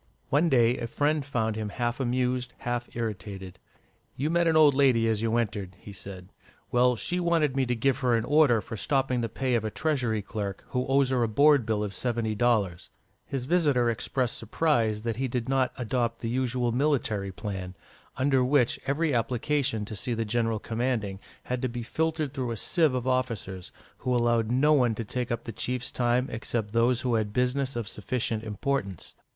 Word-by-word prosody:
One 155 +5 +3
day 120 -2 +3
a 115 - -3
friend 150 +4 0
found 115 -5 -1
him 110 -1 -3
half 120 +4 -2
amused, 125 -1 0
half 120 0 -3
irritated. 95 -5 -5 0.6
"You 150 +4 -1
met 170 0 +3
an 160 -1 +4
old 150 -2 +7
lady 130 -5 +4
as 110 -1 +1
you 115 0 +1
entered," 105 -5 -2
he 100 - -11
said. 95 -1 -9 0.4
"Well, 125 0 +4
she 180 +9 -2
wanted 165 -6 +1
me 135 -2 +1
to 125 - 0
give 130 +3 +1
her 125 -3 +2
an 115 0 0
order 140 -5 +4
for 115 - -7
stopping 135 0 0
the 115 - -2
pay 130 +3 -1
of 115 -2 +2
a 110 - -1
Treasury 120 -6 -1
clerk 100 -1 -5
who 125 0 -1
owes 135 0 +3
her 130 -2 +2
a 115 - +2
board 140 +2 +4
bill 105 -2 0
of 100 -1 -4
seventy 115 -2 -1
dollars." 105 -6 +1 0.4
His 135 -3 -3
visitor 140 -7 +3
expressed 125 +1 -2
surprise 115 -3 +1
that 115 -2 -2
he 135 +1 0
did 120 -1 -3
not 135 -1 +2
adopt 120 -1 -1
the 115 - -2
usual 125 -1 0
military 115 -7 0
plan, 95 -2 -6 0.4
under 130 -1 +3
which 125 -2 +2
every 145 +2 +1
application 120 -1 0
to 110 - -7
see 120 +3 -2
the 115 0 -1
general 115 0 0
commanding 110 -3 -2 0.2
had 125 -1 -3
to 130 - 0
be 120 0 -5
filtered 155 +2 -1
through 130 -4 -2
a 115 - -3
sieve 160 - +2
of 125 -1 -2
officers, 115 -8 -2 0.3
who 125 -1 0
allowed 120 -2 +2
no 140 +5 +4
one 125 -6 +3
to 115 - -4
take 125 +3 -3
up 115 0 -2
the 115 - -6
chief's 125 +3 -3
time 125 +1 +1
except 115 -2 -3
those 115 +2 +2
who 125 -2 0
had 110 -2 0
business 125 +3 0
of 115 -3 -3
sufficient 110 +1 -2
importance. 105 - -3
120 Hz, 195 wpm, -27 LUFS, 110-130 Hz, 0.6 s, old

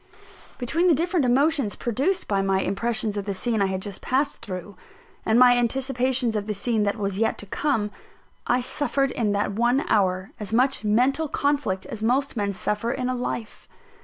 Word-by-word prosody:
Between 320 +9 +1
the 335 - +5
different 335 -2 +1
emotions 275 -2 +2
produced 275 - -1
by 200 -1 +1
my 195 0 +1
impressions 220 +1 -1
of 200 - -3
the 200 -2 -3
scene 220 +3 0
I 195 - +3
had 190 0 -3
just 200 -2 -7
passed 280 +3 -1
through, 185 +1 -7 0.5
and 220 - +4
my 245 0 +7
anticipations 250 -1 0
of 205 0 -2
the 210 - -2
scene 225 +2 0
that 200 +2 -1
was 200 -1 -2
yet 225 - +1
to - - -8
come, 215 -1 -1 0.6
I 245 +1 +2
suffered 275 +1 0
in 215 -4 0
that 200 0 0
one 240 +6 +2
hour 185 -2 +1
as 210 -1 -4
much 255 +2 +2
mental 250 +9 +2
conflict 280 -10 -1
as 220 - -7
most 260 +5 +1
men 205 -3 0
suffer 210 +3 -1
in 255 -1 -2
a 255 - -1
life. 245 -2 -5
235 Hz, 190 wpm, -24 LUFS, 205-265 Hz, 0.6 s, my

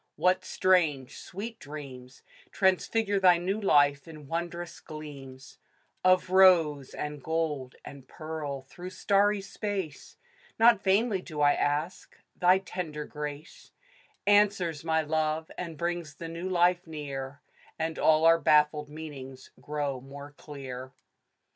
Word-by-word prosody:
What 185 +1 +2
strange, 170 -9 +1
sweet 220 +5 -7
dreams 135 -4 -10 0.3
Transfigure 200 +2 +1
thy 180 -2 +6
new 190 +5 -2
life, 145 -5 +3
in 155 -2 -11
wondrous 170 +2 -4
gleams 140 -3 -10 0.4
Of 185 0 +3
rose, 165 -7 +5
and 150 -1 -5
gold, 150 -4 -2
and 135 -2 -11
pearl, 150 -4 -6
through 175 +7 -9
starry 200 +1 +2
space? 195 -5 -5 0.4
Not 230 -2 +5
vainly 200 +1 +2
do 155 -5 -6
I 145 0 +5
ask. 150 +5 -2 0.2
Thy 180 +1 +5
tender 170 -6 -5
grace 150 +1 -8 0.5
Answers 200 -6 +3
my 160 -1 +1
love, 155 +1 -1
and 165 -3 -6
brings 170 -3 -3
the 165 - -7
new 170 +3 -5
life 175 0 +2
near; 140 -3 -6 0.4
And 160 0 -3
all 155 0 +4
our 165 0 +6
baffled 150 -1 +3
meanings 140 -4 -9
grow 145 -3 -3
more 140 +2 -10
clear. 130 -3 -9
160 Hz, 125 wpm, -28 LUFS, 145-185 Hz, 0.5 s, thy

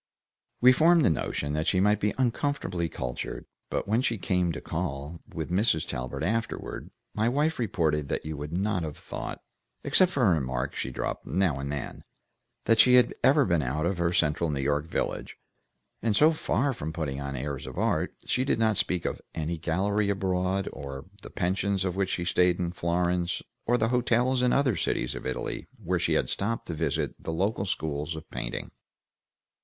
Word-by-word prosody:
We 125 +1 +9
formed 160 +3 +5
the - - +5
notion 75 -1 -2
that 80 +2 -1
she 95 - +3
might 105 +2 +3
be 105 -1 0
uncomfortably 120 - 0
cultured, 60 -4 -5 0.2
but - - -2
when 110 +4 +2
she 115 -3 0
came 90 -1 +1
to - - -4
call 80 -1 -4
with 80 +1 -4
Mrs. 90 -4 +2
Talbert 60 0 -4
afterward, 115 +3 -2 0.2
my 110 +2 +1
wife 150 +4 +1
reported 80 - 0
that - - -2
you 80 0 -4
would 75 +1 -6
not 100 -1 0
have 75 -2 -5
thought, - - -6 0.4
except 185 -1 +4
for 135 -7 +2
a 95 - +5
remark 65 -2 -2
she - - -3
dropped 65 - -4
now 95 -5 +2
and 70 +1 -4
then, 75 -2 -5 0.6
that 115 -1 +4
she 125 0 +8
had 125 - +5
ever 140 0 +5
been 85 -5 +2
out 75 +4 -1
of 90 0 -1
her 85 0 +2
central 80 0 +1
New 70 -2 -1
York 75 +3 0
village, - - -3 0.6
and 110 -2 +1
so 155 +7 +6
far 145 -3 0
from 80 -8 -5
putting 75 -5 -3
on 70 0 -4
airs 70 +1 -4
of - - -8
art, - - +1
she 125 - +1
did 135 - +1
not 110 -3 +2
speak 90 -2 0
of - - -2
any 80 +1 -2
gallery 100 +5 +1
abroad, 95 -1 0
or 70 0 -6
of 70 +8 -12
the - - -9
pensions 95 +1 0
in 90 - 0
which 95 0 0
she 90 - -1
stayed 90 0 +3
in 85 -2 -1
Florence, 85 0 0 0.2
or 120 +1 +4
the 110 -1 +1
hotels 125 +1 +2
in 125 -1 +3
other 135 -5 +3
cities 60 -6 0
of - - -6
Italy 65 - -3
where 90 -4 -1
she - - +1
had - - +2
stopped 115 +4 -2
to 85 - -4
visit 80 +1 -1
the - - -4
local 100 +4 0
schools 80 -3 -2
of 80 - -8
painting. - - -4
90 Hz, 195 wpm, -28 LUFS, 80-110 Hz, 0.6 s, We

